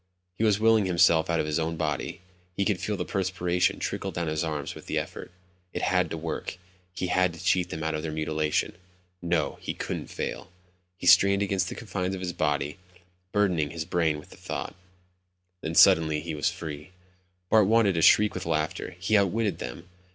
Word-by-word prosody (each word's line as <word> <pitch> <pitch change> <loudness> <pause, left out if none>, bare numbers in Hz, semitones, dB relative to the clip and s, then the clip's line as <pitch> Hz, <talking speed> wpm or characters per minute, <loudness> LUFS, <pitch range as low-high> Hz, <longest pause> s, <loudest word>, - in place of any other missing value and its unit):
He 110 - -2
was 105 -2 +3
willing 110 -2 +4
himself 85 -2 +4
out 85 -1 +1
of - - 0
his 75 +1 -1
own 80 +1 -1
body. 75 +1 -3 0.4
He 100 - +1
could 100 -3 +1
feel 100 +3 -2
the - - -3
perspiration 90 -2 0
trickle - - -3
down 85 - -3
his 80 +1 -1
arms 75 -3 -3
with - - -12
the - - -2
effort. - - -5 0.4
It - - -3
had 90 -2 +2
to 80 - -4
work. 80 +3 -5 0.3
He 90 - -4
had 90 -1 +2
to 85 - -10
cheat 90 -1 +2
them 80 - -5
out 80 0 -1
of 75 - -2
their 80 0 -4
mutilation. 75 +1 -1 0.5
No, 85 -3 -1
he - - -4
couldn't - - -4
fail. - - -5 0.5
He 90 - -8
strained 100 +3 +6
against 95 -2 0
the - - -6
confines 95 -3 -3
of 95 - -7
his 90 -1 -3
body, 75 +1 -1 0.5
burdening 90 -8 +1
his 80 +1 -5
brain 80 -3 +1
with 75 - -12
thought, - - -6 0.9
and 80 +1 -3
suddenly 80 -5 +6
he 80 +1 -5
was 75 -2 +1
free. 75 0 -7 0.6
Bart 110 -3 +6
wanted 110 -2 +4
to 80 - 0
shriek 105 +5 +6
with 90 -2 -5
laughter. 80 +2 -2
He'd 105 +4 +3
outwitted 100 -1 +1
them. 60 +9 -7
85 Hz, 195 wpm, -27 LUFS, 80-95 Hz, 0.9 s, strained